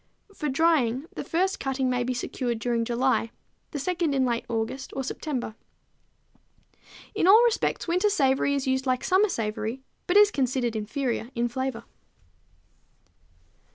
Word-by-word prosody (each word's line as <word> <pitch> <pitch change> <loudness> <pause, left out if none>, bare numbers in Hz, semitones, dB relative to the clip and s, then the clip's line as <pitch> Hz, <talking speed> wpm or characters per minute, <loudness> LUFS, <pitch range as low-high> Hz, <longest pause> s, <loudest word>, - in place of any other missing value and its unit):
For 300 -6 -3
drying, 275 -3 +2
the - - -4
first 375 +4 0
cutting 270 -1 -1
may 250 -1 0
be 250 +1 -2
secured 245 -1 -2
during 230 0 -1
July, 240 0 +1 0.4
the 300 - -5
second 330 0 -1
in 265 -1 +2
late 235 -1 -1
August 235 +4 -3
or 270 - -2
September. 260 -3 -4 1.6
In 405 -4 +1
all 435 +5 +8
respects 470 -5 0
winter 360 +5 +2
savory 280 -5 +2
is 275 - -2
used 260 0 0
like 255 -1 +1
summer 390 +3 +3
savory, 225 0 -3 0.2
but 360 - +3
is 415 0 +7
considered 255 - 0
inferior 235 +2 -2
in 240 0 +1
flavor. 255 -1 -3
265 Hz, 145 wpm, -26 LUFS, 240-320 Hz, 1.6 s, all